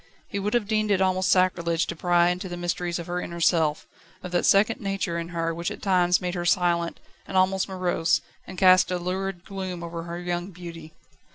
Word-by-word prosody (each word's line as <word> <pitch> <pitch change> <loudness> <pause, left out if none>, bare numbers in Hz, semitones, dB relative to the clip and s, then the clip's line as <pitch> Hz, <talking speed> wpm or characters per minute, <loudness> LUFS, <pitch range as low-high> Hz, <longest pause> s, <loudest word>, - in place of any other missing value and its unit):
He 200 - -3
would 210 +3 -1
have 225 -4 +1
deemed 215 0 +1
it 200 -2 +3
almost 185 0 +1
sacrilege 170 -2 +2
to 170 - -5
pry 175 +1 +3
into 180 +1 -4
the 175 - -5
mysteries 175 0 -2
of 170 - -6
her 180 +1 -3
inner 170 0 -6
self, 160 -3 +2 0.4
of 180 - -6
that 175 - +1
second 210 +3 +4
nature 195 -4 -2
in 170 - -4
her 165 -1 -2
which 170 +1 -3
at - - -9
times 180 -2 +3
made 180 -1 -3
her 175 -2 -3
silent, 175 -1 +1 0.3
and 190 - -2
almost 190 +1 +2
morose, 175 -2 +1 0.3
and 185 - -9
cast 185 -2 +6
a 180 - 0
lurid 185 0 -4
gloom 185 -3 -5
over 170 0 -5
her 170 0 -5
young 175 +1 -3
beauty. 170 -3 -10
180 Hz, 210 wpm, -25 LUFS, 170-190 Hz, 0.4 s, cast